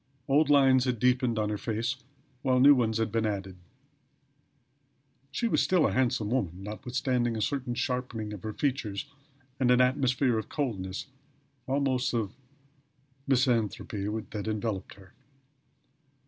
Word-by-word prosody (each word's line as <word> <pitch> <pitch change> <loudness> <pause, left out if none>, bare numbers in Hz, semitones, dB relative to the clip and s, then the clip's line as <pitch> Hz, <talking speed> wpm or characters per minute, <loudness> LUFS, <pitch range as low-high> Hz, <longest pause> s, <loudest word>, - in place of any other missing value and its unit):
Old 145 +2 +3
lines 135 -3 +5
had 125 -2 0
deepened 125 0 +2
on 105 -1 0
her 105 -1 -2
face 115 +4 -2 0.4
while 130 -2 +2
new 140 +3 +8
ones 115 -4 +1
had 115 -1 -1
been 110 0 +1
added. 95 -3 -4 1.7
She 235 - -1
was - - +2
still 180 -4 +3
a - - +2
handsome 120 -4 0
woman, 95 -7 -1
notwithstanding 120 +2 -1
a - - -3
certain 125 0 -1
sharpening 120 -4 -3
of 100 - -8
her 110 - -4
features 125 -4 -2 0.5
and 125 -2 +2
an 125 0 +5
atmosphere 125 -1 +2
of 110 - -7
coldness, 100 -10 -3 0.6
almost 135 -2 0
of 110 -3 -1 0.9
misanthropy, 115 -6 +1 0.2
that 105 -1 -4
enveloped 110 -3 -3
her. 95 -1 -17
120 Hz, 135 wpm, -29 LUFS, 105-130 Hz, 1.7 s, new